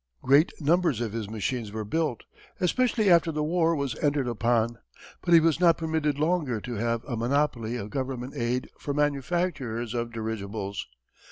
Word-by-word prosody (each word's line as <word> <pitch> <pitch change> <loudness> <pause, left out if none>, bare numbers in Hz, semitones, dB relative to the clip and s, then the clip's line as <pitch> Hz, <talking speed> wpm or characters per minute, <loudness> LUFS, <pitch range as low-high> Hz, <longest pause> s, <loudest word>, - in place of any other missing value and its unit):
Great 140 +6 +5
numbers 165 -4 +2
of 115 -3 -3
his 110 -3 -4
machines 110 +1 -3
were 110 0 -4
built, 155 +1 -1 0.4
especially 225 +3 +2
after 170 -2 +5
the 150 -1 -1
war 165 +1 +2
was 140 -5 -2
entered 145 -3 +1
upon. 115 0 +1 0.4
But 175 -1 +4
he - - +9
was 165 0 +2
not 170 -2 +5
permitted 160 -3 -1
longer 155 -7 0
to 120 +3 -6
have 115 +1 -1
a 130 - -3
monopoly 120 -1 0
of 105 -2 -6
government 130 0 -4
aid 125 0 -1
for 140 - -3
manufacturers 145 -5 -1
of 120 -1 -2
dirigibles. 105 -3 -4
130 Hz, 165 wpm, -27 LUFS, 115-160 Hz, 0.4 s, he